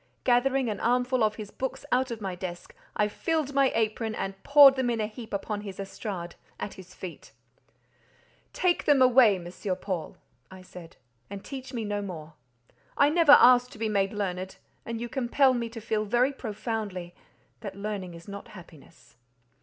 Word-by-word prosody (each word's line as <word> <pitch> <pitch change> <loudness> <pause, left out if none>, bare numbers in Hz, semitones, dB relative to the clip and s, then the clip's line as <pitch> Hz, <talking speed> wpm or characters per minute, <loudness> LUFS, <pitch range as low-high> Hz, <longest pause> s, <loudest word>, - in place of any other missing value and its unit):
Gathering 260 +1 +2
an 210 -2 -3
armful 250 0 +1
of 215 0 +1
his 210 -2 -8
books 265 +1 -5
out 255 +1 +2
of 230 -2 -6
my 190 -2 -3
desk, 180 -1 -7 0.2
I 210 - +2
filled 300 +6 -2
my 275 -1 +3
apron 220 0 -1
and 195 0 -5
poured 285 -2 +8
them 260 -2 0
in 235 -1 -1
a 215 - 0
heap 220 +1 -9
upon 205 +1 -3
his 200 -2 -8
estrade, 195 -3 -6 0.3
at 200 - -5
his 185 -1 -14
feet. 180 -3 -9 1.2
"Take 360 -1 +1
them 290 -2 +5
away, 250 -4 +6
M. 175 -2 -8 0.3
Paul," 185 -6 -4 0.3
I 185 0 -12
said, 175 -2 -12 0.3
"and 200 0 -8
teach 265 -1 -7
me 230 -3 -4
no 205 0 -2
more. 165 -5 -8 0.6
I 285 - +5
never 320 -2 +6
asked 250 -1 +7
to - - -12
be 220 0 -1
made 195 -2 +1
learned, 190 -3 -4 0.3
and 230 -1 -4
you 240 - -4
compel 260 +2 +2
me 235 -2 -2
to 230 0 -8
feel 215 -1 -2
very 245 +6 +2
profoundly 210 -7 -5 0.5
that 200 -3 -7
learning 200 -3 -5
is 170 0 -13
not 200 0 -8
happiness." 165 - -16
215 Hz, 175 wpm, -27 LUFS, 195-250 Hz, 1.2 s, poured